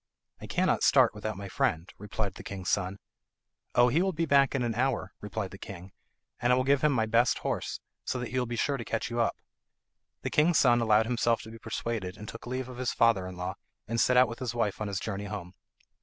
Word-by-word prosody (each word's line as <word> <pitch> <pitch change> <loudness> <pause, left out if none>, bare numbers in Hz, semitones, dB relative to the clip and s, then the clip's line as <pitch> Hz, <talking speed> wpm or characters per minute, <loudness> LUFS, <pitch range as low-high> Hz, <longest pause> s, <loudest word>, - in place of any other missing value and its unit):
"I - - -7
cannot - - +1
start - - +5
without 105 0 -4
my 100 0 -6
friend," 85 -2 0
replied 105 0 -3
the - - -10
king's 95 -2 -4
son. 95 0 0 0.8
"Oh, 120 0 +6
he 150 +8 +2
will 190 0 +1
be 165 +1 0
back 140 -2 +4
in 130 - +1
an 120 -1 0
hour," 120 -5 -1
replied 105 -1 -4
the 100 - -10
king, 95 -1 -9 0.5
"and 120 - +3
I - - +6
will 130 - +2
give 140 0 +3
him 150 - +5
my 115 -5 +2
best 115 +2 +3
horse, - - -3 0.2
so - - -2
that 125 -1 -4
he 130 - -1
will 125 - -1
be 120 - -3
sure 140 +4 0
to 120 - -5
catch 115 +1 -3
you 120 - -2
up." 115 - +2 0.9
The - - -2
king's 160 +2 +4
son 120 -2 +5
allowed 110 -1 +4
himself 115 -1 +1
to 110 - -10
be 115 - -11
persuaded 110 -4 -4
and 105 - -9
took 115 - -9
leave 130 +1 -3
of 125 -1 -9
his 130 - 0
father 115 -6 +3
in 95 -1 -8
law, 90 +1 -3 0.3
and 115 +1 +1
set 125 - +4
out 125 0 +7
with 115 +3 -7
his 125 -3 -3
wife 110 -3 -1
on 105 - -1
his 100 -1 -2
journey 100 -1 -4
home. 95 -3 -6
115 Hz, 245 wpm, -29 LUFS, 100-125 Hz, 0.9 s, out